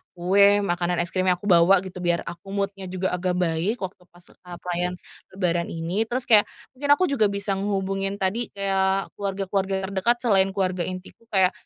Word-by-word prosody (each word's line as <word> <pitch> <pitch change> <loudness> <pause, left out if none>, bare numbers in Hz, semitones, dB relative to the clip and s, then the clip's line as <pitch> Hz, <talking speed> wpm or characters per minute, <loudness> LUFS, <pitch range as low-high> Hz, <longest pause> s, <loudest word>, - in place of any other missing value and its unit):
kue, 200 +3 +4
makanan 175 -2 0
es 175 - -8
krim 185 0 0
yang 180 - +4
aku 190 +3 -2
bawa 180 +2 +5
gitu, 185 -1 -8
biar 175 -1 0
aku 175 +2 -9
mood-nya 195 -1 -3
juga 185 +1 -2
agak 180 0 -1
baik, 180 +4 0
waktu 185 -1 -7
pas, 175 0 -19
e 180 - -20
perayaan 180 0 -3 0.4
lebaran 175 -3 0
ini. 170 +7 -2
Terus 250 +2 -2
kayak, 215 -4 +5 0.2
mungkin 285 +2 -5
aku 370 - 0
juga 220 -7 +3
bisa 200 0 -2
ngehubungin 195 0 -1
tadi 200 +4 -1
kayak 195 0 0
keluarga-keluarga 195 0 -2
terdekat, 195 +5 +2
selain 195 -5 +4
keluarga 185 -2 0
intiku 185 +4 -8
kayak, 190 -2 +4
190 Hz, 180 wpm, -24 LUFS, 180-200 Hz, 0.4 s, bawa